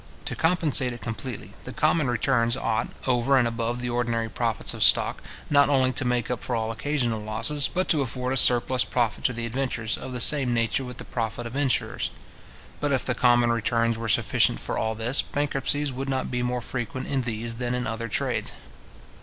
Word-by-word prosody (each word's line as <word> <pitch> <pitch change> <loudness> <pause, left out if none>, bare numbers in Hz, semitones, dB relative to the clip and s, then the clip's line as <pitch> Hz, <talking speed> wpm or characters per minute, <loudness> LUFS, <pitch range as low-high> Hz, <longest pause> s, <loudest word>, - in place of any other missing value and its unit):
To - - -3
compensate 160 -7 +1
it 120 - -10
completely, 115 +1 -6
the - - -7
common 155 -5 +2
returns 120 0 +1
ought, 110 -5 -1 0.2
over 130 +2 +2
and 120 -2 +3
above 115 +1 -3
the 125 0 -2
ordinary 115 -2 -1
profits 115 -1 -1
of - - -8
stock, - - +4 0.3
not 145 -1 +4
only 130 -2 +3
to 135 - 0
make 125 0 -1
up 125 - -3
for 125 - -2
all 110 0 -1
occasional 120 -2 -2
losses, 115 +7 +1
but 185 +1 -1
to 150 - +4
afford 125 0 -3
a - - 0
surplus 125 -1 +4
profit 115 +1 -1
to - - +3
the 115 0 -4
adventurers, 120 -2 -2
of 130 - -7
the 125 - -4
same 130 -1 +5
nature 115 +4 0
with 125 -1 -8
the - - -7
profit 115 0 -4
of 115 +2 -7
insurers. 140 -2 0 0.7
But 145 - -1
if 130 - 0
the 125 - 0
common 120 -1 +3
returns 115 0 +1
were 115 0 -4
sufficient 105 - +3
for - - -2
all 110 0 -1
this, 115 +4 +1
bankruptcies 145 0 -1
would 135 +2 -4
not 130 -1 -2
be 125 -1 -1
more 125 0 -1
frequent 130 +2 -4
in 135 -2 -1
these 115 -1 -3
than 125 0 -1
in 125 0 -2
other 115 -1 -3
trades. 110 - -2
125 Hz, 205 wpm, -25 LUFS, 115-130 Hz, 0.7 s, same